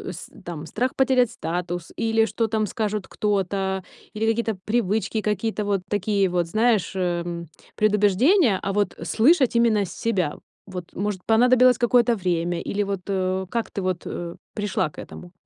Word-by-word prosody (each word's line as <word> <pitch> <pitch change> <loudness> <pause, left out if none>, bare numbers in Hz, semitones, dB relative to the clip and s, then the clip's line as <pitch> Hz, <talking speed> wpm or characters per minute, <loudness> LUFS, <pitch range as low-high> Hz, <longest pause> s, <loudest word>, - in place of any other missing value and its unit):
с - - -9 0.2
там, 165 -2 -6
страх 250 - -2
потерять 255 -3 +3
статус, 175 -2 -4
или 225 0 +2
что 225 +2 -1
там 215 0 0
скажет 210 -1 -3
кто-то, 195 -2 -1 0.3
или 215 +1 -1
какие-то 225 -1 0
привычки, 215 -1 0
какие-то 210 +1 -1
вот 200 -2 0
такие 200 -1 +1
вот, 175 -1 0
знаешь, 215 -1 +2
э, 175 -2 -2 0.3
предубеждения, 210 - +3
а 195 - -2
вот 205 -2 0
слышать 260 +1 +3
именно 225 -4 +3
с 175 - -9
себя? 185 -10 -1 0.3
Вот 180 -3 -8
может, 195 -1 -3
понадобилось 250 +2 +5
какое-то 240 -1 +4
время 175 -3 -1
или 205 +1 -1
вот, 200 -2 -3
э, 190 -1 -1
как 235 -1 -2
ты 200 - -4
вот, 185 -2 -2
э, 170 0 -5 0.2
пришла 205 -6 -1
к - - -13
этому? 175 - -10
205 Hz, 160 wpm, -24 LUFS, 185-225 Hz, 0.3 s, понадобилось